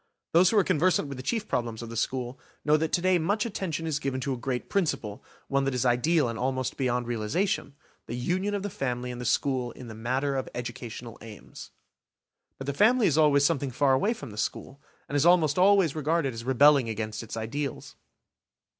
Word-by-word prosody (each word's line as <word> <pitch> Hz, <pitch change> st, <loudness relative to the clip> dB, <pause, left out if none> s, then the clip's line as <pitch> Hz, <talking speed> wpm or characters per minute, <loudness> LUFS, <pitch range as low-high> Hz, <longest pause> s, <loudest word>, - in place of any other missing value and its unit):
Those 175 Hz, +2 st, +5 dB
who 220 Hz, -, +1 dB
are 200 Hz, -, +6 dB
conversant 180 Hz, -2 st, +2 dB
with 140 Hz, -, -6 dB
the -, -, -5 dB
chief 215 Hz, -, -2 dB
problems 120 Hz, -1 st, -2 dB
of 115 Hz, -, -8 dB
the 115 Hz, -, -7 dB
school 125 Hz, +2 st, -2 dB, 0.3 s
know 150 Hz, 0 st, +5 dB
that 155 Hz, +1 st, 0 dB
to 175 Hz, -, +2 dB
day 185 Hz, -1 st, +3 dB
much 205 Hz, +7 st, 0 dB
attention 180 Hz, -7 st, -3 dB
is 155 Hz, -2 st, -1 dB
given 135 Hz, -2 st, -2 dB
to 135 Hz, 0 st, -1 dB
a -, -, -2 dB
great 125 Hz, 0 st, -3 dB
principle, 135 Hz, -, -2 dB, 0.2 s
one 140 Hz, 0 st, +1 dB
that 135 Hz, -1 st, -1 dB
is 125 Hz, -, 0 dB
ideal 130 Hz, +5 st, +3 dB
and 115 Hz, -1 st, -4 dB
almost 130 Hz, 0 st, -1 dB
beyond 125 Hz, -2 st, -1 dB
realisation,–the 140 Hz, -, -3 dB
union 185 Hz, +11 st, -1 dB
of 200 Hz, -, -3 dB
the 205 Hz, -, -4 dB
family 125 Hz, -3 st, -3 dB
and 125 Hz, 0 st, -7 dB
the -, -, -5 dB
school 130 Hz, 0 st, 0 dB
in 125 Hz, -3 st, -10 dB
the -, -, -7 dB
matter 130 Hz, +5 st, -1 dB
of 130 Hz, -, -3 dB
educational 120 Hz, -1 st, -7 dB
aims. 110 Hz, -1 st, -11 dB, 0.9 s
But 135 Hz, -, -7 dB
the 140 Hz, -, -2 dB
family 220 Hz, -, +4 dB
is 155 Hz, -, +3 dB
always 145 Hz, -2 st, +5 dB
something 145 Hz, -4 st, +1 dB
far 135 Hz, +2 st, +2 dB
away 205 Hz, -, +1 dB
from 125 Hz, -, -9 dB
the 105 Hz, -, -11 dB
school, 135 Hz, +5 st, -4 dB, 0.3 s
and 145 Hz, -, -5 dB
is 145 Hz, -, +3 dB
almost 170 Hz, -3 st, +4 dB
always 190 Hz, -5 st, +5 dB
regarded 155 Hz, -2 st, 0 dB
as 115 Hz, 0 st, -7 dB
rebelling 130 Hz, 0 st, +4 dB
against 110 Hz, 0 st, -4 dB
its 115 Hz, 0 st, -7 dB
ideals. 130 Hz, +5 st, -4 dB
135 Hz, 210 wpm, -27 LUFS, 120-165 Hz, 0.9 s, are